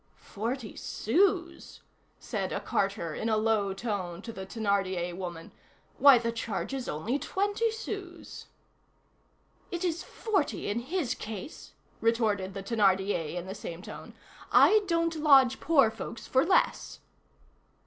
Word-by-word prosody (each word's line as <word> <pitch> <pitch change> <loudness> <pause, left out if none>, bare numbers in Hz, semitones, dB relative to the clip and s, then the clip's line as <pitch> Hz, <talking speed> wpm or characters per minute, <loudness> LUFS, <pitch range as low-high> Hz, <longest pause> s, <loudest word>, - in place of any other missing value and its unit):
"Forty 230 +2 -5
sous!" 345 - 0 0.4
said - - -4
a - - -1
carter, 195 -5 -1
in 225 - -2
a 220 - +2
low 215 -2 +1
tone, 195 -3 -4
to 230 - -7
the 190 -2 -7
Thénardier 190 -5 -1
woman; 175 -3 -7 0.5
"why, 280 -2 +9
the 230 0 -1
charge 230 +3 -4
is 265 -2 -4
only 220 - -2
twenty 410 +6 0
sous!" 405 -5 -7 1.2
"It 350 -2 -4
is 340 -1 -1
forty 385 - -2
in 210 +3 -1
his 270 0 -2
case," 220 - -8 0.3
retorted 215 -4 +1
the 195 - -5
Thénardier, 195 -6 +1
in 175 0 -4
the 190 - -6
same 175 -3 -7
tone. - - -10 0.4
"I 430 0 +6
don't 335 -1 +1
lodge 270 -4 +5
poor 275 -8 +4
folks 225 0 -7
for 260 +1 +3
less." 370 +2 +1
230 Hz, 135 wpm, -29 LUFS, 195-320 Hz, 1.2 s, why